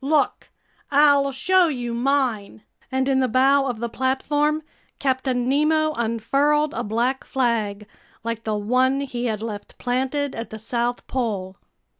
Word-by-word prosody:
Look! 290 +1 +1 0.4
I'll 285 -1 +4
show 365 +7 +3
you 245 -6 -3
mine!" 235 - -1 0.3
And 265 0 0
in 270 -1 +2
the 260 - +2
bow 270 +3 +3
of 245 -3 -2
the 235 +2 -3
platform, 290 +5 0 0.3
Captain 260 -2 0
Nemo 310 +3 +2
unfurled 275 +6 +1
a - - -2
black 240 +5 -1
flag, 220 -5 -1 0.4
like 230 0 -4
the 215 -1 -1
one 255 +6 +2
he 250 -3 -4
had 220 -2 -2
left 210 -3 -7
planted 265 +3 -1
at 230 - -6
the 220 - -7
South 240 +2 -2
Pole. 205 -7 -3
255 Hz, 145 wpm, -23 LUFS, 230-280 Hz, 0.4 s, I'll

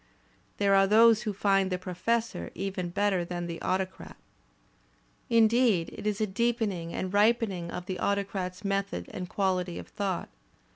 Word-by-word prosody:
There 200 -1 +3
are 195 0 +5
those 220 +1 +6
who 220 -3 -2
find 195 -1 +2
"The 180 - 0
Professor" 185 - -2
even 185 -1 -3
better 195 0 +1
than 175 0 -4
"The 170 -1 -6
Autocrat." 185 0 -3 1.1
Indeed 230 -5 +3
it - - -5
is 210 0 -1
a 215 - +2
deepening 210 -5 -1
and 185 +2 -4
rip)ening 205 -4 +2
of 180 +1 -6
the 185 -1 -4
Autocrat's 195 -1 -2
method 195 - -2
and 180 -1 -5
quahty 185 -3 -1
of - - -9
thought. 195 -3 -3
195 Hz, 150 wpm, -28 LUFS, 180-210 Hz, 1.1 s, those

